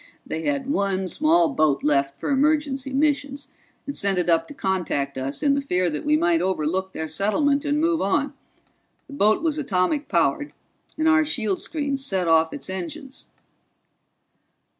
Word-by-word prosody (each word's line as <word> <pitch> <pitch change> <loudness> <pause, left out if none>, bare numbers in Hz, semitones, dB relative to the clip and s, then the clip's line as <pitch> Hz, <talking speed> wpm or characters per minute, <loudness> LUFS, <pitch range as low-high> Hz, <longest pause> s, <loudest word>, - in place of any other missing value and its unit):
"They 160 - -5
had 280 -2 -1
one 195 -8 0
small 315 - +2
boat 155 - +1
left 140 -1 +1
for - - -2
emergency 280 -1 +1
missions, 285 0 -1 0.4
and 280 - -5
sent 200 -2 0
it 175 -1 +1
up 165 - +2
to 290 - -11
contact 175 - -2
us 135 - -4
in 285 -1 +4
the 280 - 0
fear 180 -10 0
that 150 - -5
we 300 +1 +3
might 335 0 +2
overlook 190 +1 -1
their 160 - -4
settlement 275 - 0
and 290 0 +1
move 330 0 +1
on. 280 +9 0 0.7
The 280 - -13
boat 215 0 +2
was 310 -2 0
atomic 255 +3 0
powered, 170 - 0 0.4
and 315 +1 +1
our 315 0 +5
shield 225 -10 -1
screens 280 -3 -2
set 190 -9 -1
off 160 0 +4
its - - -7
engines." 260 - -7
265 Hz, 165 wpm, -23 LUFS, 180-290 Hz, 0.7 s, our